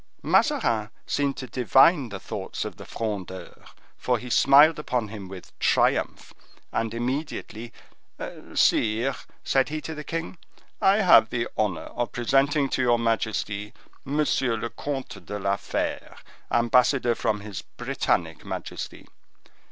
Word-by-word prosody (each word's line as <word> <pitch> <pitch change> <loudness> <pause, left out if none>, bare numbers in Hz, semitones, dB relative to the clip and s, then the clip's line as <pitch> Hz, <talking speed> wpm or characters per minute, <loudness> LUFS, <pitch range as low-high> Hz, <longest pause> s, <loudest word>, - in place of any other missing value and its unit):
Mazarin - - +2 0.2
seemed 140 -1 -1
to 130 - -5
divine 130 - +4
the 100 -2 -6
thoughts - - -5
of - - -7
the - - -10
Frondeur, 100 -5 -5 0.5
for 125 -1 +1
he 125 +1 -8
smiled 145 +6 +6
upon 125 -7 -2
him 100 -3 -8
with 95 0 -10
triumph, - - +1 0.4
and 115 -1 -1
immediately,—"Sire," 120 -2 -2 0.3
said 135 0 +2
he 155 +1 -3
to 160 - -6
the 150 -1 -7
king, 165 +2 -5 0.4
"I 195 +3 +4
have 115 - +7
the 115 -1 -1
honor 105 -6 0
of 120 -1 -4
presenting 135 +4 +2
to 130 - 0
your 120 -1 +3
majesty, 110 -2 -1 0.3
Monsieur 135 -4 0
le 115 +2 -4
Comte 135 -9 -5
de 105 +4 -5
la 100 0 0
Fere, - - -3 0.3
ambassador 125 +1 +3
from 105 -2 -1
his 100 -3 -6
Britannic - - -2
majesty. - - -6
120 Hz, 130 wpm, -25 LUFS, 110-140 Hz, 0.5 s, have